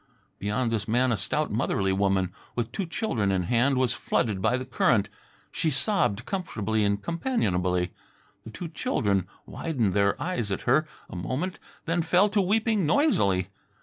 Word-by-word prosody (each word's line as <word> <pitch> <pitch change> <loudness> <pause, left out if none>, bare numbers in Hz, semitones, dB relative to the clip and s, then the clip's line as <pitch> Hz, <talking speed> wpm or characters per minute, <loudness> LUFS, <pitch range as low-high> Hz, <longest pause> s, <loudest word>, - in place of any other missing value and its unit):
Beyond 115 +4 -1
this 110 -2 -1
man 125 +3 +2
a - - +2
stout 110 +10 -1
motherly 100 -3 0
woman, 95 -2 +1 0.2
with 120 -1 -2
two 185 +7 -3
children 120 - -1
in 95 -2 +1
hand, 125 +8 +2
was 125 -2 +2
flooded 105 -5 -1
by 125 - +2
the 130 - -5
current. 100 -5 +2 0.4
She 160 - 0
sobbed 145 - +1
comfortably 110 - -1
and 100 0 +1
companionably. 90 - 0 0.5
The - - -9
two 160 +10 -7
children 105 - 0 0.2
widened 120 - -1
their 100 0 +2
eyes 120 - -2
at 95 - -2
her 155 +6 +2 0.2
a - - -10
moment, 130 - -3 0.3
then 165 +1 +1
fell 180 +5 +3
to 205 0 +2
weeping 210 -1 +1
noisily. 100 - +2
115 Hz, 160 wpm, -27 LUFS, 100-165 Hz, 0.5 s, fell